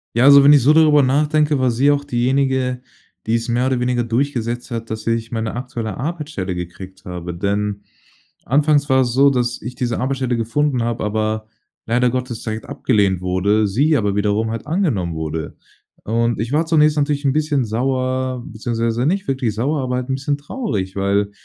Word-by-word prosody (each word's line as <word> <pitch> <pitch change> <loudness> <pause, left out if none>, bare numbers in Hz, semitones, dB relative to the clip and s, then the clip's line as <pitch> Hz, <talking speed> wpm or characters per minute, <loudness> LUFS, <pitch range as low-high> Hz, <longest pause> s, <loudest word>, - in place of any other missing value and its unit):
Ja, 120 +2 +4
also 140 0 +8
wenn 140 - +7
ich 145 -2 +6
so 145 +6 +5
darüber 155 -2 +5
nachdenke, 150 +2 +2
war 130 -2 +2
sie 130 +5 +2
auch 145 0 +2
diejenige, 130 0 0 0.5
die 115 - +2
es 115 0 -2
mehr 120 +2 +1
oder 130 -2 0
weniger 125 -1 0
durchgesetzt 120 0 -2
hat, 115 -2 -5
dass 110 0 -6
ich 115 0 -1
meine 115 -1 -3
aktuelle 120 -4 -5
Arbeitsstelle 150 - -4
gekriegt 90 +2 -8
habe, 90 -1 -6
denn 100 +3 -2 0.6
anfangs 145 +2 +2
war 130 0 +4
es 120 -2 0
so, 140 +2 +5
dass 120 -3 -1
ich 125 +3 -7
diese 120 -2 -2
Arbeitsstelle 130 -1 -1
gefunden 125 +3 0
habe, 115 0 -2
aber 110 +1 -2 0.4
leider 125 +2 +2
Gottes 125 -2 -4
direkt 110 0 -4
abgelehnt 105 -10 +1
wurde, 100 +4 +1
sie 140 +11 +2
aber 105 -4 0
wiederum 105 +2 0
halt 115 +4 -6
angenommen 135 - -1
wurde. 80 0 -4 0.5
Und, 115 0 0
ich 115 +2 -4
war 155 +3 +2
zunächst 155 -2 +3
natürlich 145 0 0
'n 135 - +3
bisschen 150 -3 +1
sauer, 130 +2 -1
beziehungsweise 115 +1 -2
nicht 190 +5 0
wirklich 130 -5 -1
sauer, 140 +6 -1
aber 125 -1 -2
halt 125 +1 -4
'n 130 - +1
bisschen 145 +1 -2
traurig, 115 - -4
weil 100 +1 0
125 Hz, 185 wpm, -19 LUFS, 110-140 Hz, 0.6 s, also